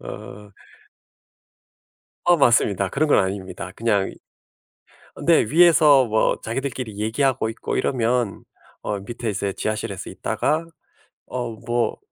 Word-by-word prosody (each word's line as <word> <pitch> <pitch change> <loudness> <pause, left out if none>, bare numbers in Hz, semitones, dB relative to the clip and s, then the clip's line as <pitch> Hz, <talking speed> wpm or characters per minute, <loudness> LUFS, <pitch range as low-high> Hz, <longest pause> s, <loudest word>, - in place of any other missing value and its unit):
어. 105 +1 -10 1.7
어 175 0 +5
맞습니다. 105 - +3
그런 150 +9 0
건 - - +5
아닙니다. 95 -1 -3
그냥 105 -4 0
이 - - -15 1.0
어 - - -9
네 - - +5
위에서 155 -4 +6
뭐 110 -1 +1
자기들끼리 125 -2 -4
얘기하고 120 +2 0
있고 115 - -4
이러면 120 -3 0 0.4
어 100 -1 -3
밑에 115 +2 -4
이제 100 0 -2
지하실에서 105 -3 -4
있다가 155 +2 -1 0.6
'어 125 -2 -4
뭐 120 +2 -2
115 Hz, 255 characters per minute, -22 LUFS, 100-135 Hz, 1.7 s, 위에서